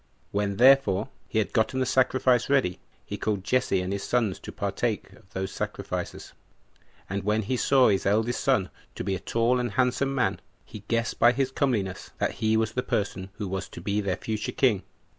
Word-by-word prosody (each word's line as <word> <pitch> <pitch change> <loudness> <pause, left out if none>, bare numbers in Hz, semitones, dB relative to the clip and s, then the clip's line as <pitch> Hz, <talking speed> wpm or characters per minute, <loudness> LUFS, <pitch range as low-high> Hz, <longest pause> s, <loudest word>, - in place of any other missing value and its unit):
When, 100 -1 -1
therefore, 125 -6 +5 0.2
he - - -3
had 110 - 0
gotten 120 +4 +1
the 130 - +2
sacrifice 130 -1 +2
ready, 130 -11 +2 0.3
he - - -6
called 105 -3 -1
Jesse 110 -4 +1
and 90 +1 -3
his 100 - -3
sons 115 -6 0
to - - -8
partake - - -2
of 90 - -20
those 95 0 -4
sacrifices; - - -5 0.7
and 100 +1 -3
when 105 +2 +1
he 125 +6 -1
saw 130 +1 +4
his 100 -1 +1
eldest 110 +4 +1
son 130 -9 +2 0.2
to - - -4
be 95 +1 -1
a 95 - -2
tall 115 +5 +1
and 120 -1 -2
handsome 130 +1 +1
man, 130 - 0 0.2
he 110 - -9
guessed 115 0 -1
by 120 +1 +6
his 135 0 0
comeliness 110 -10 -1
that - - 0
he 110 0 +3
was 110 -1 +1
the 125 - -1
person 100 -5 -2
who 105 0 -5
was 95 0 -4
to - - -9
be 105 +1 -1
their 95 -2 -1
future 110 -1 -3
king. 115 -8 +3
110 Hz, 200 wpm, -27 LUFS, 100-125 Hz, 0.7 s, by